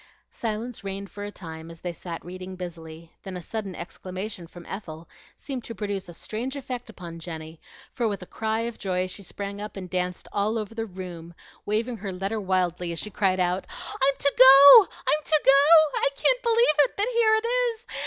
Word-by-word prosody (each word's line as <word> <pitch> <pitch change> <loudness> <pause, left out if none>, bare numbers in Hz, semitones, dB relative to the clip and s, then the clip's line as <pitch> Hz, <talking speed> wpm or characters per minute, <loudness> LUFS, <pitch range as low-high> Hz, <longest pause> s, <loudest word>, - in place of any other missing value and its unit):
Silence 225 +1 -4
reigned 195 0 -6
for 205 - -7
a 205 - -5
time, 160 -4 -9
as 165 0 -12
they 175 -1 -4
sat 170 -1 -7
reading 185 +1 -8
busily; 165 -2 -9
then 190 -2 -7
a - - -5
sudden 205 -1 -5
exclamation 185 +1 -7
from 175 +1 -13
Ethel 165 -5 -8 0.3
seemed 265 -4 -6
to 230 - -8
produce 200 -2 -4
a - - -9
strange 245 - -5
effect 250 -3 -6
upon 170 -6 -9
Jenny, 160 -1 -8 0.3
for 240 -3 -1
with 200 -3 -3
a - - -9
cry 220 +3 -2
of 235 0 -5
joy 185 -1 -1
she 185 +2 -7
sprang 200 +1 -6
up 210 -1 -7
and 185 -2 -7
danced 180 -1 -2
all 210 +3 0
over 215 0 -4
the 225 0 -4
room, 175 -3 -9 0.3
waving 225 +3 -1
her 200 -1 -5
letter 195 +4 -3
wildly 180 -2 0
as 170 - -5
she 210 +7 -5
cried 190 -1 +1
out, 180 +1 0 0.3
"I'm 275 0 +2
to 280 - +1
go! 275 - +11
I'm 305 0 -1
to 310 -1 +2
go! 295 +3 +6
I - - +3
can't - - +2
believe 470 0 +4
it 285 -3 +4
but 405 - +2
here 450 -2 +4
it 440 +1 0
is! 475 -1 0
200 Hz, 205 wpm, -25 LUFS, 180-245 Hz, 0.3 s, go